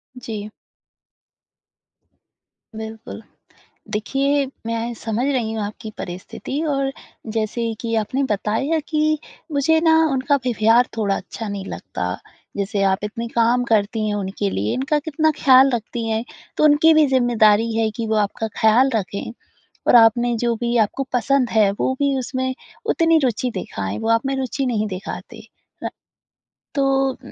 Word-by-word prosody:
जी। 215 -4 -6 2.3
बिल्कुल। 220 +1 -8 0.7
देखिए 275 +6 0 0.2
मैं 230 +1 -2
समझ 225 +2 -2
रही 245 -6 0
हूँ 220 -1 -3
आपकी 215 +1 -7
परिस्थिति 185 +10 -5
और 275 -1 0 0.4
जैसे 225 +1 -1
कि 230 -1 -2
आपने 220 +6 0
बताया 225 +10 0
कि 310 -1 +1 0.3
मुझे 290 +3 +3
ना 320 - +5 0.2
उनका 265 +2 +2
व्यवहार 230 +1 +3
थोड़ा 200 -3 +1
अच्छा 215 +3 -6
नहीं 200 -1 -4
लगता। - - -4 0.4
जैसे 200 0 -1
आप 190 -1 +2
इतने 230 +3 -4
काम 235 +2 +2
करती 215 -1 +1
हैं, 210 - -1
उनके 200 0 -2
लिए 105 - -1
इनका 270 +4 0
कितना 315 +1 +1
ख़याल 265 0 +7
रखती 230 0 -4
हैं 225 +1 -1 0.3
तो - - +2
उनकी 305 +2 +6
भी 310 -1 +5
ज़िम्मेदारी 230 -4 +3
है 225 -1 +1
कि 230 -2 -2
वो 220 - 0
आपका 210 +1 -1
ख़याल 235 +5 +5
रखें। 200 +1 -3 0.6
और - - +7
आपने 235 +1 +5
जो 235 0 +1
भी 240 +1 -1
आपको 220 +5 +1
पसंद 250 +1 +2
है 215 -3 +4
वो - - +1
भी 280 -1 +2
उसमें 260 +1 -2 0.3
उतनी 330 -1 +3
रुचि 250 +1 0
दिखाएँ, 100 - -4
वो - - -3
आप 230 +3 +2
में 270 0 -1
रुचि 265 +1 -2
नहीं 220 -4 0
दिखाते। 185 0 -7 0.4
अ, - - 0 0.9
तो 280 - +2 0.3
उम, 260 0 -13
230 Hz, 150 wpm, -21 LUFS, 215-270 Hz, 2.3 s, ख़याल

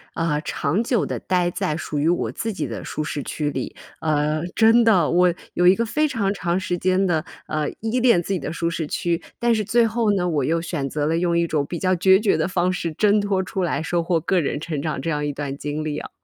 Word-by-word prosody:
呃， 165 -3 0
长 170 +7 -1
久 235 -3 +1
地 - - -4
待 180 -1 0
在 180 -5 -2
属 150 -3 -3
于 155 +3 +2
我 175 - 0
自 225 -1 -3
己 160 -7 -3
的 110 -7 -6
舒 155 - -4
适 145 0 -3
区 145 +2 -3
里。 130 - -4 0.3
呃， 150 0 +1
真 225 +1 +5
的， 190 -9 +4
我 180 +1 +4 0.2
有 180 0 +3
一 185 - +7
个 230 +2 0
非 305 +7 +1
常 205 -7 -1
长 175 -1 -1
时 180 -1 -2
间 185 +1 +2
的， 160 -4 +1 0.2
呃， 155 -1 -1
依 225 +3 0
恋 235 -8 +4
自 195 - -2
己 180 - -1
的 - - -5
舒 170 0 -2
适 160 -3 -3
区。 170 +1 -1 0.2
但 235 -1 +2
是 215 - 0
最 235 +3 +3
后 225 -1 +1
呢， 180 -2 0
我 150 -5 0
又 165 +4 +1
选 160 -5 -3
择 150 -1 -1
了 160 +2 +1
用 170 -1 +1
一 170 - +2
种 155 -3 0
比 170 +4 -5
较 185 +1 +1
决 190 +2 +5
绝 210 -5 +2
的 160 - 0
方 180 0 0
式 170 -2 -3
挣 205 +5 +3
脱 195 -2 0
出 190 +1 -4
来， 165 -2 -1
收 170 0 0
获 170 0 +1
个 180 +3 +1
人 145 -1 -2
成 155 -3 -4
长 155 -3 -3
这 165 +5 -2
样 150 0 -1
一 145 - -1
段 140 -1 -4
经 150 +2 -4
历 150 -1 -3
啊。 - - -8
175 Hz, 275 characters per minute, -22 LUFS, 155-195 Hz, 0.3 s, 一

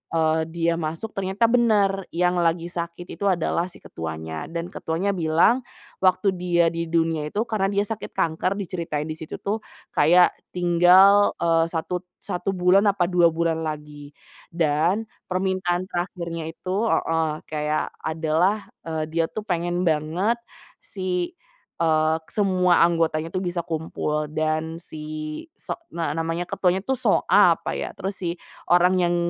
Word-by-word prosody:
eee, 160 0 +2
dia 170 0 +1
masuk 165 +6 -4
ternyata 195 +4 +1
bener, 210 -5 +3
yang 180 +1 +1
lagi 170 0 +1
sakit 170 0 -5
itu - - -7
adalah 170 -1 0
si - - -12
ketuanya, 80 -1 -6
dan 170 +1 -3
ketuanya 180 +4 -2
bilang 170 +10 +3 0.4
waktu 185 +1 +3
dia 175 -1 +2
di 170 0 -1
dunia 165 -2 +1
itu 215 +2 0
karena 200 -3 0
dia 200 0 +2
sakit 220 -1 -5
kanker 185 +5 -1
diceritain 165 -5 -3
di 155 - -4
situ 160 -1 -8
tuh 210 +2 -3 0.3
kayak 175 +4 +5 0.2
tinggal, 180 +3 +6
eee, 165 -1 +3
1- 180 +2 -3 0.2
1 180 +2 -3
bulan, 185 +1 +4
apa 180 -3 0
2 175 -2 +4
bulan 165 0 0
lagi, 150 -2 -6 0.4
dan 170 +6 +1 0.2
permintaan 185 -1 0
terakhirnya 170 -3 -4
itu 185 +2 -7 0.2
heeh, 165 -1 +1 0.2
kayak 150 0 -1 0.2
adalah, 165 +6 0 0.2
eee, 160 -1 -2
dia 165 +1 0
tuh 215 - -4
pengen 175 0 -1
banget 165 +9 +1 0.5
si, 185 - -3 0.5
eee, 155 -1 +3
semua 185 -4 +3
anggotanya 165 -1 0
tuh 185 - -1
bisa 175 -1 -2
kumpul 155 -1 -2
dan 155 +1 -1
si 155 -2 -6 0.2
so - - -4 0.2
nge 165 -3 -2
namanya 165 +2 -1
ketuanya 185 -1 +1
tuh 265 - +1
So - - +2
Ah, - - +6
apa - - -4
ya, - - -3
terus 195 +1 -3
si 170 0 -2 0.3
orang 180 +1 +5
yang 175 0 +2
170 Hz, 145 wpm, -24 LUFS, 160-185 Hz, 0.5 s, tinggal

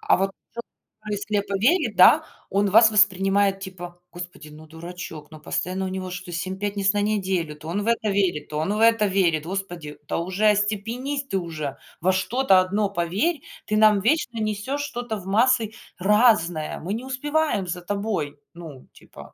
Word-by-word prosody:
А, - - +3
а - - +3
вот 195 0 0
ц - - -22 0.8
кто - - -1
и - - -1
слепо 205 -1 -2
верит, 275 - +2
да, - - +7 0.2
он 200 +1 +1
вас 220 +2 +7
воспринимает, 195 -1 +3
типа: 175 -2 -9
"Господи, 175 -3 -9
ну 155 +1 -13
дурачок. 160 -1 -9
Ну 155 - -11
постоянно 185 +4 -2
у - - -2
него 185 0 -5
что-то 180 0 -7
семь 185 +2 -3
пятниц 200 -1 +1
на 205 - 0
неделю: 190 -7 -1
то 150 +1 -12
он 200 +4 -2
в 225 - -6
это 230 -2 +1
верит, 185 -7 0
то 150 - -4
он 160 +7 -1
в - - -2
это 230 -2 +5
верит. 175 -6 +1
Господи, 175 -5 -5
да - - -2
уже 185 +5 0
остепенись 225 +7 -1
ты 195 - 0
уже. 155 -6 -5 0.2
Во 185 +3 +3
что-то 190 +2 +3
одно 200 +3 0
поверь. 200 - -1 0.3
Ты 215 0 0
нам 215 -2 +5
вечно 240 0 0
несёшь 215 +7 -2
что-то 245 -5 -4
в 190 - -11
массы 225 +1 +3 0.3
разное. 195 -6 +2
Мы 185 +5 -4
не 240 +4 -5
успеваем 290 -5 -1
за 175 0 -4
тобой! 185 -7 -3 0.2
Ну 160 -6 -11
типа, - - -15
195 Hz, 185 wpm, -24 LUFS, 175-215 Hz, 0.8 s, да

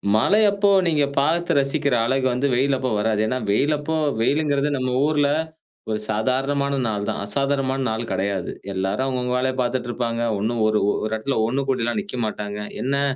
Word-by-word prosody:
மழை 200 - +4
அப்போ 200 0 +2 0.2
நீங்க 150 -3 +2
பாத்து 165 +5 +2
ரசிக்கிற 140 -1 +1
அழகு 130 +1 +1
வந்து 130 +3 0
வெயில் 135 +3 +2
அப்போ 130 -1 -2
வராது. 105 0 +1
ஏன்னா 130 - -1
வெயில் 140 +9 +2
அப்போ 160 +2 -3 0.3
வெயிலுங்கிறது 145 +2 +1
நம்ம 130 -1 -1 0.2
ஊர்ல 145 -2 +2 0.6
ஒரு 105 -1 -1
சாதாரணமான 135 +5 0
நாள் 105 -2 -2
தான், - - -2
அசாதாரணமான 135 +2 0
நாளு 110 +2 -2
கிடையாது. 95 -1 -1 0.2
எல்லாரும் 95 +7 -1
அவங்கவங்க 125 -1 -1
வேலைய 130 +1 0
பாத்துட்டுருப்பாங்க, 120 -1 -2 0.2
ஒண்ணும் 115 +3 -1
ஒரு 110 0 +2
ஒரு - - -2
இடத்துல 110 +5 -2
ஒண்ணு 130 +4 0
கூடிலாம் 120 - 0
நிக்க 200 -8 -8
மாட்டாங்க. 105 -1 -4 0.2
என்னா, 140 +2 0
130 Hz, 165 wpm, -22 LUFS, 110-140 Hz, 0.6 s, மழை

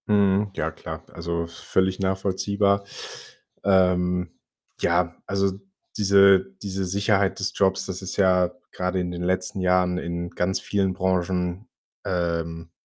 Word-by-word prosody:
Mhm, 100 0 +3
ja - - -1
klar, - - -8
also, 85 0 -3
völlig 95 +2 -1
nachvollziehbar. 100 +1 +1 0.8
Ähm, 90 -2 +2 0.5
ja, 85 0 +1
also, 100 -1 0 0.4
diese 100 -8 +5
diese 95 -1 -2
Sicherheit 100 +1 +1
des 100 - -1
Jobs, 95 -1 +2
das 95 0 -5
ist 95 - -5
ja 90 -2 +4 0.2
grade 90 +1 -1
in 90 0 -3
den 90 0 -5
letzten 95 +2 -1
Jahren 90 0 +2
in 85 0 -4
ganz 90 +2 0
vielen 95 -2 0
Branchen, 90 +2 -1 0.4
ähm, 85 -2 -2
95 Hz, 125 wpm, -24 LUFS, 90-100 Hz, 0.8 s, diese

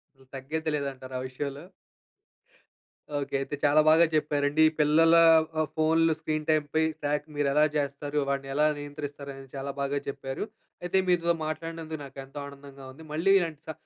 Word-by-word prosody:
అసల 135 0 -22
తగ్గేదేలేదంటారా 140 -2 -4
ఆ - - -5
విషయంలో. 140 +2 -5 1.6
ఓకె. 140 - -4
అయితే 145 - -4
చాలా 150 +1 +5
బాగా 165 +2 +6
చెప్పారండి. 150 0 +2 0.2
పిల్లల 160 +2 +5 0.5
ఆహ్, 155 - 0
ఫోన్‌లు 160 +1 +3
స్క్రీన్ 155 -1 -2
టైంపై 155 0 +2 0.2
ట్రాక్ 150 0 -1
మీరు 145 -1 +1
ఎలా 150 +1 +5
చేస్తారు? 145 +1 -2
వాడిని 135 0 -2
ఎలా 150 +2 +3
నియంత్రిస్తారు? 145 -1 -7
అని 135 -1 -12
చాలా 135 +1 -4
బాగా 140 +1 -1
చెప్పారు. 135 +5 -4 0.4
అయితే 175 +2 +1
మీతో 170 -1 +3
మాట్లాడినందుకు 160 0 -5
నాకు 135 0 -14
ఎంతో 135 +2 -9
ఆనందంగా 140 -1 -12
ఉంది. 160 +3 -13
మళ్ళీ 175 +6 +3
ఇలాంటి 160 -4 -4
స - - -1
145 Hz, 150 wpm, -28 LUFS, 140-155 Hz, 1.6 s, బాగా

